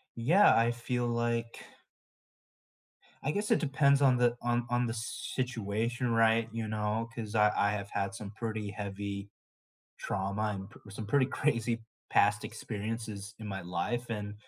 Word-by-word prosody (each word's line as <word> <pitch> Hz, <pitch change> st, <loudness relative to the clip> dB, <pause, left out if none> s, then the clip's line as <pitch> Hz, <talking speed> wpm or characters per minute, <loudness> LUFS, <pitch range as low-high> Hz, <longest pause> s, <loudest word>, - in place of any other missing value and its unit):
Yeah, 165 Hz, -, +6 dB
I 115 Hz, +1 st, +4 dB
feel 120 Hz, +1 st, -2 dB
like 115 Hz, 0 st, -1 dB, 1.6 s
I 145 Hz, -, +1 dB
guess 205 Hz, +3 st, -1 dB
it -, -, +5 dB
depends 140 Hz, -1 st, +3 dB
on 130 Hz, -3 st, +5 dB
the 120 Hz, -1 st, +3 dB
on 120 Hz, 0 st, +1 dB
on 120 Hz, 0 st, +2 dB
the 115 Hz, -, -2 dB
situation, 115 Hz, 0 st, -2 dB
right, 115 Hz, 0 st, +4 dB
you 115 Hz, -1 st, -2 dB
know, 110 Hz, +2 st, -1 dB
‘cause 110 Hz, -2 st, -5 dB
I 105 Hz, 0 st, +5 dB
I 100 Hz, 0 st, +3 dB
have 100 Hz, -1 st, -3 dB
had 100 Hz, 0 st, -1 dB
some 100 Hz, 0 st, -7 dB
pretty 110 Hz, -2 st, -3 dB
heavy 100 Hz, -1 st, -5 dB, 0.7 s
trauma, 100 Hz, +2 st, -1 dB
and 95 Hz, +1 st, -7 dB
p -, -, -16 dB
some 105 Hz, +2 st, -6 dB
pretty 130 Hz, +5 st, +3 dB
crazy 115 Hz, -5 st, 0 dB, 0.3 s
past 105 Hz, +1 st, +4 dB
experiences 110 Hz, -1 st, -5 dB
in 110 Hz, -, -7 dB
my 95 Hz, -1 st, -4 dB
life, 90 Hz, +8 st, -2 dB
and, 105 Hz, -2 st, -3 dB
115 Hz, 155 wpm, -31 LUFS, 105-120 Hz, 1.6 s, Yeah